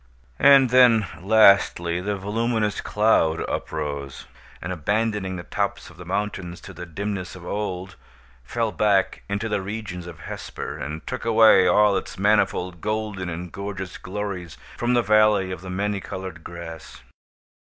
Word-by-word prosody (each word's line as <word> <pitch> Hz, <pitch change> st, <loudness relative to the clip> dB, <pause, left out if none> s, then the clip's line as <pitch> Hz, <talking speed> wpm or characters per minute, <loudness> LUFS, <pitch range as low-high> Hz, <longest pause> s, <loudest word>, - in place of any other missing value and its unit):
And 135 Hz, -3 st, +7 dB
then, 120 Hz, -4 st, +6 dB, 0.2 s
lastly, 95 Hz, -4 st, +4 dB
the 100 Hz, +2 st, -2 dB
voluminous 105 Hz, +1 st, -1 dB
cloud 105 Hz, -7 st, +2 dB
uprose, 70 Hz, -3 st, -4 dB, 0.3 s
and, 90 Hz, +3 st, -4 dB
abandoning 100 Hz, +2 st, -1 dB
the 85 Hz, -, -6 dB
tops -, -, -3 dB
of 90 Hz, -, -18 dB
the 90 Hz, -, -10 dB
mountains 95 Hz, -2 st, -3 dB
to -, -, -10 dB
the 90 Hz, +1 st, -8 dB
dimness 95 Hz, +2 st, -4 dB
of 90 Hz, -2 st, -11 dB
old, 95 Hz, -3 st, -4 dB, 0.5 s
fell 115 Hz, -, -2 dB
back 100 Hz, 0 st, +1 dB
into 100 Hz, +3 st, -2 dB
the 105 Hz, -2 st, -1 dB
regions 95 Hz, -3 st, -6 dB
of 85 Hz, -2 st, -10 dB
Hesper, -, -, -6 dB
and 75 Hz, +2 st, -6 dB
took 125 Hz, -, -5 dB
away 110 Hz, -4 st, +6 dB
all 105 Hz, -1 st, +4 dB
its -, -, -6 dB
manifold 95 Hz, -4 st, +1 dB
golden 105 Hz, -4 st, -3 dB
and 85 Hz, +1 st, -6 dB
gorgeous 100 Hz, -2 st, -6 dB
glories 95 Hz, -4 st, -5 dB, 0.2 s
from 120 Hz, +1 st, 0 dB
the 120 Hz, -, +3 dB
Valley 105 Hz, -3 st, +4 dB
of 90 Hz, -, -6 dB
the 95 Hz, -, -8 dB
Many 100 Hz, +2 st, -1 dB
Colored 95 Hz, -3 st, -7 dB
Grass. 85 Hz, -2 st, -9 dB
100 Hz, 150 wpm, -24 LUFS, 90-105 Hz, 0.5 s, And